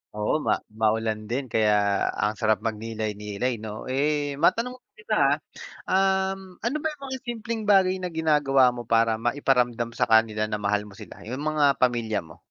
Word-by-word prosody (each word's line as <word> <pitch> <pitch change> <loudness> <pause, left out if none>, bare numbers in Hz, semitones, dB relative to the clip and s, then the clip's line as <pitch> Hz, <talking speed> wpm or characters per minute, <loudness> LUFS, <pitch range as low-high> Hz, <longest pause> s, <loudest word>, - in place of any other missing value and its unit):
Oo, 105 0 0
ma 105 - +4 0.3
maulan 110 0 +1
din 130 +3 -1
kaya 110 -1 +3 0.5
ang 105 +1 +1
sarap 110 -1 +2
mag-nilay-nilay 110 +1 -3
'no 110 +3 -7
eh, 145 0 0
ma-tanong 250 +2 +2 0.2
kita 215 0 -2 0.7
um, 190 0 +1
ano 245 - 0
ba 315 - 0
yung 290 - -18
mga 260 - -3
simpleng 230 -1 -4
bagay 190 -2 +4
na 180 -2 -5
ginagawa 145 -5 +3
mo 120 -1 -6
para 115 -1 +2
ma-iparamdam 120 -1 +1
sa - - +3
kanila 110 -1 +3
na 105 -1 -4
mahal 105 +1 0
mo 105 - -13
sila - - -12
yung 125 +5 -5
mga 155 -1 +1 0.2
pamilya 115 -4 +1
mo? 80 -1 -15
120 Hz, 165 wpm, -25 LUFS, 110-175 Hz, 0.7 s, ma